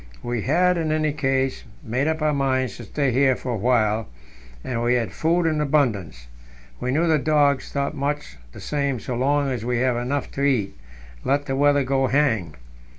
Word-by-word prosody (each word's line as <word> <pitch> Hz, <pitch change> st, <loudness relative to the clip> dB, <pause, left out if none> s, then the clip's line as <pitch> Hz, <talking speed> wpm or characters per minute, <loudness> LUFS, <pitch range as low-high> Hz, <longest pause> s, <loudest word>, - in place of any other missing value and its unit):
We 120 Hz, -2 st, -2 dB
had, 180 Hz, -, +2 dB
in 160 Hz, -2 st, -1 dB
any 155 Hz, -1 st, +1 dB
case, 135 Hz, -3 st, -1 dB, 0.2 s
made 125 Hz, +6 st, -1 dB
up 160 Hz, -1 st, -1 dB
our 155 Hz, -1 st, +2 dB
minds 130 Hz, -2 st, 0 dB
to 120 Hz, -, -9 dB
stay 140 Hz, +5 st, 0 dB
here 130 Hz, +1 st, +3 dB
for 125 Hz, -, -5 dB
a -, -, -1 dB
while, 110 Hz, -1 st, +1 dB, 0.6 s
and 120 Hz, -2 st, -3 dB
we 120 Hz, +1 st, +2 dB
had 120 Hz, -2 st, -1 dB
food 170 Hz, +2 st, +1 dB
in 155 Hz, -2 st, +1 dB
abundance. 110 Hz, -, 0 dB, 0.5 s
We 125 Hz, -, -3 dB
knew 155 Hz, +6 st, +2 dB
the 160 Hz, -2 st, +3 dB
dogs 145 Hz, -2 st, +2 dB
thought 140 Hz, 0 st, -1 dB
much 140 Hz, -, -3 dB
the -, -, -12 dB
same 140 Hz, -4 st, -1 dB
so 125 Hz, -, -5 dB
long 140 Hz, +3 st, +1 dB
as 120 Hz, -4 st, -3 dB
we 125 Hz, 0 st, -1 dB
have 125 Hz, 0 st, +1 dB
enough 130 Hz, +4 st, -2 dB
to 140 Hz, -, -5 dB
eat, 130 Hz, -8 st, +1 dB, 0.5 s
let 145 Hz, +1 st, +1 dB
the 135 Hz, -, -2 dB
weather 145 Hz, 0 st, +3 dB
go 135 Hz, 0 st, +1 dB
hang. 115 Hz, -, +1 dB
135 Hz, 195 wpm, -23 LUFS, 120-145 Hz, 0.6 s, here